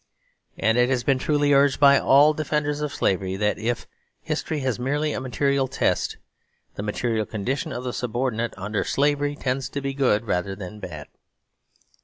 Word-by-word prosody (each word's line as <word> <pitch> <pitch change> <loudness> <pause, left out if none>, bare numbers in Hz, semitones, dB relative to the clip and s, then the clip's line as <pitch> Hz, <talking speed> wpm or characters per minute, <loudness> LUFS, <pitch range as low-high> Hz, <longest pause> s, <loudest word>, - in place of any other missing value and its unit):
And 110 +2 +2
it 125 +1 +4
has 125 -2 0
been 135 -2 +2
truly 145 0 +2
urged 140 0 +4
by 140 -1 +7
all 145 +3 +5
defenders 150 -1 -1
of 150 -1 -2
slavery 95 -3 0
that, 105 +2 0
if 115 +2 -2 0.4
history 155 -2 -2
has 130 -2 -1
merely 145 +4 0
a - - -3
material 135 +1 0
test, 130 - 0 0.6
the - - -6
material 110 +1 -1
condition 120 +6 -3
of 125 - -5
the 125 -1 -3
subordinate 120 -1 -2
under 100 +2 -2
slavery 145 0 +1
tends 130 -1 -2
to 140 - -4
be 135 0 -3
good 125 -6 +1
rather 95 -1 -1
than 100 +2 -8
bad. 80 -7 -7
130 Hz, 170 wpm, -24 LUFS, 110-140 Hz, 0.6 s, by